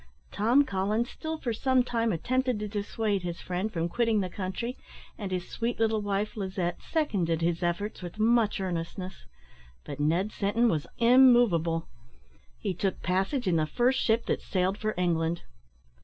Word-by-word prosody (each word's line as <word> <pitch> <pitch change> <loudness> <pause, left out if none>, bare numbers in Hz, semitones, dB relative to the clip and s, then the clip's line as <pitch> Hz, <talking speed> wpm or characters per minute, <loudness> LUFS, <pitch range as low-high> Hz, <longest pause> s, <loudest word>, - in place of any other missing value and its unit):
Tom 235 +7 +4
Collins 210 +3 -1
still 320 0 -5
for 240 -6 -2
some 260 +2 +2
time 230 -2 0
attempted 255 +7 0
to 210 0 -3
dissuade 205 0 -1
his 175 -1 -5
friend 185 +4 -3
from 165 -2 -1
quitting 230 +3 +1
the 185 -2 -2
country, 205 +7 -4 0.4
and 200 -3 -6
his 180 -1 -2
sweet 230 0 -3
little 220 -1 +2
wife, 205 +2 -2
Lizette, 185 -4 -3
seconded 185 - 0
his 170 0 0
efforts 180 +5 -2
with 175 +2 -7
much 220 -1 +3
earnestness; 180 - -4 0.6
but 145 0 -7
Ned 170 +8 +1
Sinton 220 +4 +1
was 155 -6 -1
immovable. 235 -10 +5 0.7
He 195 - -2
took 190 +1 -2
passage 195 +8 0
in 170 -2 +3
the 155 -1 +1
first 245 - +2
ship 225 +1 +2
that - - -1
sailed 190 +1 -1
for 215 0 -2
England. 170 -1 0
200 Hz, 160 wpm, -28 LUFS, 175-230 Hz, 0.7 s, immovable